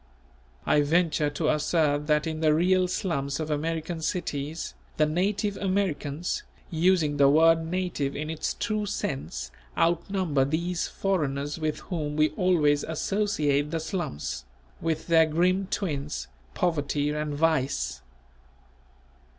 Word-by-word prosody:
I 150 - +4
venture 155 0 +2
to 155 +1 -1
assert 150 -1 +1
that 150 0 +3
in 160 -1 -3
the 155 -1 +4
real 185 +2 +3
slums 140 -7 -2
of 155 -1 -3
American 160 +2 -2
cities, 155 -2 -3 0.2
the 155 - +4
native 195 +6 0
Americans, 180 -5 -1 0.3
using 165 -3 +2
the 140 -1 +6
word 165 +2 +5
native 175 -6 -2
in 155 +2 -3
its 160 - -2
true 215 -2 -1
sense, 65 - -3 0.3
outnumber 170 -3 +1
these 170 +5 -1
foreigners 145 -6 -1
with 155 -1 -2
whom 150 -5 -3
we 155 0 +4
always 150 -4 +2
associate 155 -4 0
the 165 +1 -1
slums, 155 - -4 0.4
with 160 -1 -1
their 165 -1 +5
grim 180 +5 +2
twins 140 - -3 0.3
Poverty 145 -4 0
and 150 -1 -2
Vice. 130 - 0
155 Hz, 125 wpm, -27 LUFS, 145-175 Hz, 0.4 s, the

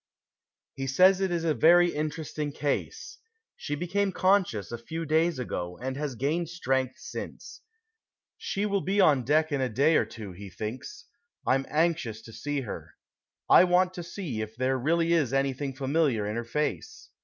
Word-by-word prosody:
He 135 0 -4
says 185 +8 +5
that 195 - +1
it 185 - -3
is 170 -1 -1
a 160 -2 +2
very 175 +3 +5
interesting 150 -1 -3
case. 150 - -3 0.4
She 145 - -4
became 190 +5 -1
conscious 185 - +1
a 120 - -5
few 160 +7 -5
days 160 +1 +2
ago, 90 -8 -4
and 130 +1 -4
has 145 -2 -3
gained 155 +7 -1
strength 130 -6 -1
since. - - -8 0.7
She 200 +2 -3
will 200 -1 0
be 195 +3 0
on 145 -9 +5
deck 155 +4 +2
in 140 -2 0
a 130 - 0
day 140 +8 +3
or - - +2
two, 105 -2 -9
he 100 +2 -10
thinks. 110 - -7 0.4
I'm 135 +1 +1
anxious 150 -8 0
to 115 - -12
see 145 +6 -3
her. 120 - -8 0.5
I - - +8
want 180 +1 +3
to 180 - -6
see 165 - -5
if 110 0 -6
there 130 +2 0
really 165 +5 +2
is 150 -6 +1
anything 135 0 -1
familiar 135 -5 +1
in 105 +1 -3
her 120 0 -3
face. 150 - -3
150 Hz, 180 wpm, -28 LUFS, 130-170 Hz, 0.7 s, I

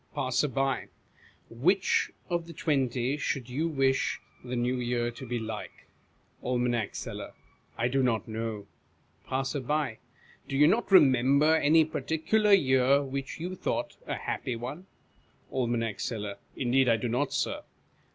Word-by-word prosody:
Passer. 130 +3 +1 1.0
Which 180 +12 +2 0.2
of 170 -2 -2
the 170 - -9
twenty 135 -3 0
should 135 -4 -3
you 155 +6 0
wish 135 -4 +1 0.2
the 125 0 -4
New 125 +1 0
Year 120 -1 -1
to 130 +2 -9
be 120 +1 -2
like? 110 -1 -6 0.6
Aim. 125 -1 +1 0.2
Seller. - - -6 0.4
I 115 - +1
do 135 +2 +1
not 115 -5 +1
know. 110 -2 -4 0.6
Passer, 135 +2 -1
Do 135 -1 -4
you 150 - +7
not 220 +5 +1
remember 140 -2 +6
any 160 +1 +5
particular 160 +7 +1
year 135 -5 +5
which 135 +1 -5
you 180 +3 -4
thought - - -3
a - - -1
happy 125 - -3
one? 130 +11 -7 0.7
Aim. 115 -4 -1
Seller. 105 -3 -4 0.2
Indeed 130 0 +2
I 115 - +4
do 120 - -2
not, 125 +5 0
Sir. - - -1
130 Hz, 135 wpm, -29 LUFS, 120-150 Hz, 1.0 s, you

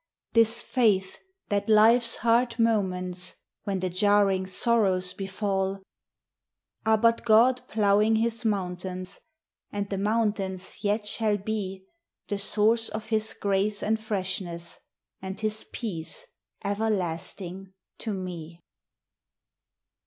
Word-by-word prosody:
This 230 0 +4
faith 205 -7 +1 0.3
that 205 +1 0
life's 230 +2 +5
hard 235 +1 +2
moments, 185 -6 0 0.3
When 195 -3 -2
the 185 - 0
jarring 195 0 +3
sorrows 190 -3 +1
befall, 195 0 -2 1.0
Are 220 0 +5
but 230 +1 +3
God 240 +3 +5
ploughing 210 +1 +3
his 230 +1 0
mountains; 185 -2 -3 0.5
And 205 0 -3
the 195 - -1
mountains 205 -3 -1
yet 210 +1 0
shall 210 0 +1
be 195 -2 -4 0.4
The 205 -2 -1
source 220 +3 +3
of 215 0 -6
his 220 -1 0
grace 200 +1 0
and 220 +1 +1
freshness 185 -5 -4 0.4
And 190 +1 -6
his 215 0 -1
peace 205 - -4 0.4
everlasting 195 -2 -2 0.3
to 225 - -3
me. 175 -4 -6
205 Hz, 110 wpm, -27 LUFS, 190-220 Hz, 1.0 s, life's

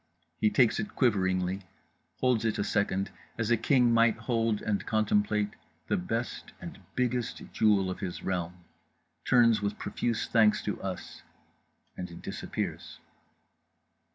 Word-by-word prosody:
He 110 - +4
takes 120 0 +3
it 105 - -4
quiveringly, 95 -5 +1 0.6
holds 125 -4 +2
it 115 -1 0
a 105 - 0
second 100 -2 0 0.3
as 115 0 -1
a - - +6
king 120 +1 +3
might 115 -1 +4
hold 115 -1 0
and 105 -2 -1
contemplate 105 -1 +1 0.4
the - - +3
best 115 +7 -3
and - - -9 0.2
biggest 125 -2 -1
jewel 105 -3 +3
of - - -6
his 95 -4 -5
realm, 90 -1 -3 0.6
turns 115 -3 +5
with 100 0 -2
profuse 115 -2 -2
thanks 110 -2 +3
to 105 - -3
us—and 90 -1 -10
disappears…. - - -5
105 Hz, 125 wpm, -29 LUFS, 95-115 Hz, 0.6 s, a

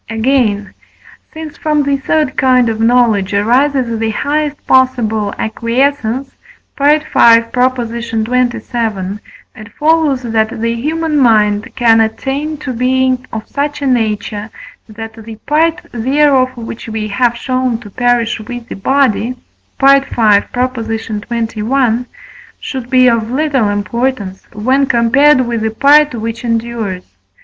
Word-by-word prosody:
Again, 225 -3 0 0.6
since 315 -2 -9
from 300 -1 0
the 280 0 +1
third 290 +1 -1
kind 255 -2 +3
of 220 -1 -3
knowledge 225 -4 +2
arises 245 +2 +1
the 225 0 -1
highest 295 +5 -2
possible 235 -5 +1
acquiescence 245 +3 -1 0.5
(V. 295 +2 +3
xxvii.), 230 -6 +5 2.1
it 220 +1 -12
follows 305 -4 +2
that 220 -1 -1
the 230 +1 -1
human 305 +5 -1
mind 210 -4 +2
can 225 -2 +4
attain 275 +7 -2
to 270 -3 -5
being 255 +1 0
of 220 -1 -6
such 290 0 -3
a - - -1
nature, 215 -4 -1 0.4
that 225 +1 -8
the 225 0 -9
part 325 +3 +1
thereof 260 +1 +1
which 230 0 -8
we 220 -1 -3
have 240 +3 0
shown 255 -1 -1
to 205 -3 -12
perish 245 0 0
with 240 +2 -8
the - - -6
body 250 +1 +1 0.4
(V. 270 - +1
xxi.) 230 -1 0 0.5
should 260 -3 -6
be 255 -1 +4
of 230 -2 +1
little 265 -4 0
importance 205 -1 -3
when 260 +6 +1
compared 260 +4 +4
with 235 -2 -2
the 220 - 0
part 285 +4 +4
which 230 +1 -5
endures. 230 -5 -3
245 Hz, 120 wpm, -14 LUFS, 220-275 Hz, 2.1 s, xxvii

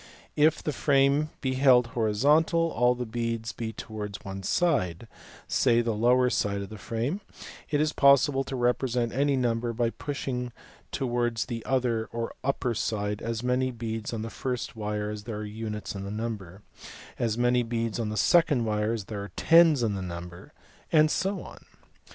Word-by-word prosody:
If 155 +2 +3
the 150 - -2
frame 140 +2 +3
be 130 -1 0
held 130 -2 +5
horizontal, 150 +10 +2
and - - -8
all 125 0 +3
the 125 0 -4
beads 115 0 -3
be 115 -1 -5
towards 105 -2 -6
one 95 0 -6
side, 115 - 0 0.4
say 120 -2 +3
the 115 -1 -1
lower 125 +4 +3
side 100 -1 0
of 100 - -9
the 110 -1 -9
frame, 120 - -3 0.5
it 145 - +1
is 155 0 +1
possible 140 0 +4
to 135 - -5
represent 120 -1 0
any 140 +2 +2
number 120 -2 0
by 115 0 0
pushing 125 -4 -4 0.4
towards 120 -3 -1
the 115 -3 -5
other 125 -4 0
or 115 0 -4
upper 130 -2 0
side 105 -2 -2
as 115 0 -3
many 125 +1 +1
beads 115 -2 -4
on 110 -2 -4
the 115 - -6
first 125 -3 -4
wire 105 -1 -3
as 105 -1 -7
there 115 -3 -5
are 105 - -5
units 105 -1 -5
in 100 -1 -6
the 100 - -5
number, 105 -3 -5 0.6
as 115 -2 0
many 120 0 +3
beads 115 -1 -2
on 110 -2 -1
the 105 - -4
second 150 -7 +4
wire 105 0 0
as 110 -4 -4
there 105 -1 -5
are 100 - -8
tens 165 -5 +5
in 110 -3 +1
the 95 - -4
number, 90 +5 -8 0.4
and 155 -1 +5
so 195 +2 -1
on. - - -12
115 Hz, 180 wpm, -27 LUFS, 110-130 Hz, 0.6 s, held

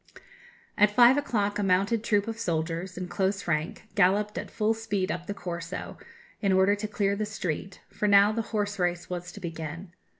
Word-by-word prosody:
"At 210 0 +6
five 240 +4 +6
o'clock 210 -8 0
a - - +1
mounted 200 +4 +2
troop 205 -1 +1
of 225 0 -4
soldiers, 170 -1 -2
in 180 0 -4
close 195 +1 -1
rank, 155 0 -1
galloped 205 +2 +2
at - - -5
full 220 0 +1
speed 210 -4 -2
up 175 0 -5
the 205 - -2
Corso, 175 -2 -6 0.4
in 200 -3 +2
order 190 +2 +4
to 205 +1 -3
clear 200 -1 0
the 210 +1 -2
street, 190 -2 -4
for 210 - -1
now 200 +1 +6
the 230 +1 -1
horse 205 -2 -2
race 175 0 -1
was 180 0 -4
to - - -9
begin. 165 +1 -6
200 Hz, 190 wpm, -27 LUFS, 180-210 Hz, 0.4 s, At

